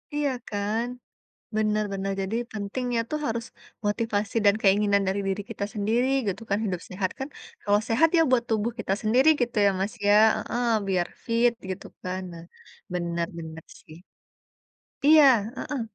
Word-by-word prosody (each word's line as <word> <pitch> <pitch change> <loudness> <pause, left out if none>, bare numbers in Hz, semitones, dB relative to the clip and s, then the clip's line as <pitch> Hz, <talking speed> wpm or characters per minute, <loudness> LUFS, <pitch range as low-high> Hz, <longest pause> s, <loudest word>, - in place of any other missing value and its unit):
Iya, 295 -1 +1 0.2
kan? 210 +3 -1 0.7
Bener 215 0 +1
bener. 195 0 -2
Jadi 200 +4 -2
pentingnya 230 +4 -2
tuh, 305 - -1
harus 230 0 -2 0.4
motivasi 210 0 -1
dan 200 - +6
keinginan 200 0 +4
dari 200 +1 0
diri 195 +1 -1
kita - - -3
sendiri, 225 +5 +1 0.2
gitu 195 +3 -3
kan, 200 - +2
hidup 180 -4 -2
sehat. 185 0 -2
Kan, 265 - -4 0.3
kalau 205 0 +3
sehat, 260 +8 +4
ya 330 - +5
buat 240 -2 +3
tubuh 220 +1 0
kita 210 - -2
sendiri, 245 +7 +4
gitu 240 -2 -1
ya, 200 - +5
Mas, 200 +4 -2
ya? 205 - +6 0.2
Heeh, 240 0 -2 0.2
biar 180 -2 +1 0.2
fit, 235 +1 +3 0.2
gitu 185 - -5 0.2
kan. 185 +1 -3
Nah, 165 0 -10 0.5
bener 170 -1 -1
bener, 160 -1 -8 0.2
sih. 155 - -14 1.1
Iya, 305 0 +8 0.3
heeh. 290 -5 -3
210 Hz, 160 wpm, -26 LUFS, 195-235 Hz, 1.1 s, Iya